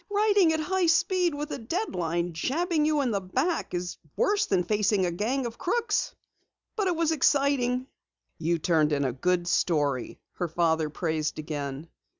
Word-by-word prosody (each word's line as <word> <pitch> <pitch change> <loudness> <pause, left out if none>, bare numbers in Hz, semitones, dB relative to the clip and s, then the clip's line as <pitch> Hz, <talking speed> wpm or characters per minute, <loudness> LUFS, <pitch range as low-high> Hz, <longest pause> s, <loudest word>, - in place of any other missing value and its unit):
"Writing 410 -4 +4
at 320 - 0
high 365 +3 +1
speed 345 0 +2
with 295 +1 -5
a - - -4
deadline 175 - -2
jabbing 310 - 0
you 305 -1 +2
in 255 -4 0
the 200 -2 -1
back 235 - -1
is 180 0 -4 0.2
worse 410 0 +2
than 185 -2 +2
facing 205 0 +1
a 175 - 0
gang 240 +9 -1
of 230 -1 -6
crooks. 465 +6 0 0.6
But 410 -3 0
it 355 - +1
was 325 -1 +1
exciting." 275 -4 +2 0.5
"You 170 +1 +1
turned 155 -2 +2
in 140 -1 +1
a 130 - -1
good 175 +6 0
story," 145 -7 0 0.2
her 175 - -1
father 160 -1 +1
praised 155 -1 -2
again. 145 -1 -5
210 Hz, 165 wpm, -27 LUFS, -, 0.6 s, Writing